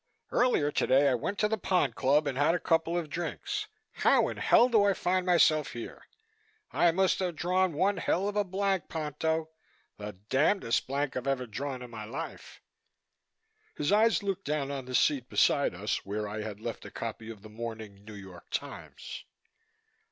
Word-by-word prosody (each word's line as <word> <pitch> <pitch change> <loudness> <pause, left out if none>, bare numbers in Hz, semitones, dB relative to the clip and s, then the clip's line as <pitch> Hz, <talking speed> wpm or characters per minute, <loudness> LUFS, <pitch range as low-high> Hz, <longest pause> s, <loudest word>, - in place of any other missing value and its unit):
Earlier 240 -13 +2
today 140 0 +3
I - - +2
went 155 - -2
to 210 - +2
the 220 0 -2
Pond 175 -10 +1
Club 140 +5 +2
and 140 -3 -2
had 145 +5 +3
a - - -1
couple 165 +1 +1
of 170 -3 -2
drinks. 400 - -4 0.3
How - - +3
in - - -6
hell 240 - +5
do 225 -5 +4
I 200 -1 +4
find 185 0 0
myself 155 -4 +4
here? 120 - -8 0.6
I 175 - +4
must 190 +2 +2
have 180 -3 -2
drawn 180 +2 +1
one 190 +7 +1
hell 195 +3 0
of 205 - -3
a 205 - +2
blank, 195 -1 -1
Ponto, 160 +1 -2 0.5
the 105 0 -6 0.2
damndest 135 - +2
blank 140 +1 -2
I've 130 +1 -3
ever 135 -2 0
drawn 130 +3 -5
in 125 - -10
my 110 -2 -7
life." 115 +5 -8 1.1
His 145 +3 -1
eyes 220 +1 +4
looked 195 -1 -3
down 140 -1 -1
on 135 -2 -5
the 125 0 -4
seat 135 -3 +2
beside 140 -10 +2
us, 105 +4 -2
where 105 +1 -3
I 105 +1 -4
had 105 -1 -6
left 115 +1 -6
a - - -8
copy 115 -1 -6
of 110 -3 -10
the 110 - -11
morning 110 -3 -7
New 105 0 -10
York 95 -3 -12
Times. - - -6
145 Hz, 185 wpm, -29 LUFS, 115-185 Hz, 1.1 s, hell